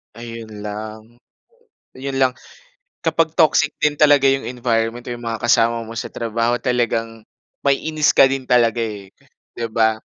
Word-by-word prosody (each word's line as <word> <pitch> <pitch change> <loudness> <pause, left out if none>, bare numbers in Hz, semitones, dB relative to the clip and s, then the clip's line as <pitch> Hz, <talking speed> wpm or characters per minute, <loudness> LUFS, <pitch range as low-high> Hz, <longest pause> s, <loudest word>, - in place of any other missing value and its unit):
Ayun 115 -1 -9
lang. 110 +1 -6 0.9
'Yun 135 +1 -4
lang, 130 -1 +4 0.7
kapag 165 0 +2
toxic 155 -2 +4
din 150 -1 +2
talaga 145 -2 +5
'yung 135 0 +2
environment 120 -1 -1
o 120 - -3
yung 120 0 -9
mga 115 -1 -4
kasama 115 0 +2
mo 115 - -9
sa 115 - -4
trabaho, 115 +1 -1
talagang 115 -3 -1 0.4
maiinis 150 +2 +2
ka - - +9
din 135 0 -3
talaga, 120 -1 +3
eh, 105 -4 -6 0.4
'di 115 -1 -3
ba? 110 -1 +1
120 Hz, 150 wpm, -20 LUFS, 115-135 Hz, 0.9 s, ka